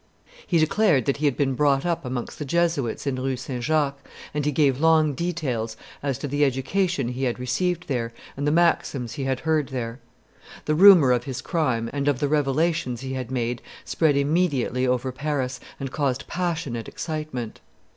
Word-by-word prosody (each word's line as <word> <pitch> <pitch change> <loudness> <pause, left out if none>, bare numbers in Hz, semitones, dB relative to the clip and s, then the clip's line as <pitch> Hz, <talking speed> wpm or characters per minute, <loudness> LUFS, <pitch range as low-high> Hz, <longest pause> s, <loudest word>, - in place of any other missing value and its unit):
He 175 - +2
declared 160 - +3
that 140 - +1
he 150 - -1
had 140 -3 +2
been 135 -2 +1
brought 140 +1 +2
up 170 -3 -1
amongst 125 -2 -5
the - - -2
Jesuits 150 -6 0
in 135 -2 -1
Rue 130 -1 -1
St. 125 -1 -5
Jacques, 145 -1 0 0.3
and 150 0 -1
he - - +2
gave 140 -3 +2
long 160 -2 +4
details 130 -9 -2 0.2
as 140 -3 -1
to 145 - -4
the 145 +2 +1
education 135 +2 0
he 130 +2 -2
had 120 - -1
received 175 +8 -1
there 120 -5 -2 0.2
and 145 +1 -2
the - - +3
maxims 155 -7 +1
he 135 - -4
had 130 -1 -1
heard 155 -3 +1
there. 120 -2 -4 0.7
The 155 - +1
rumor 175 -5 +8
of 125 -1 +1
his 130 -2 -4
crime 130 -7 0
and 140 0 -2
of 140 -4 +2
the 145 - +1
revelations 145 -2 0
he 130 0 -4
had 130 -2 -4
made 120 -2 -2 0.2
spread 155 -4 +2
immediately 140 -4 +1
over 125 +1 0
Paris 130 -2 -2 0.2
and 135 -2 -4
caused 140 -3 -1
passionate 165 -10 -3
excitement. 150 -8 -5
140 Hz, 185 wpm, -24 LUFS, 125-155 Hz, 0.7 s, rumor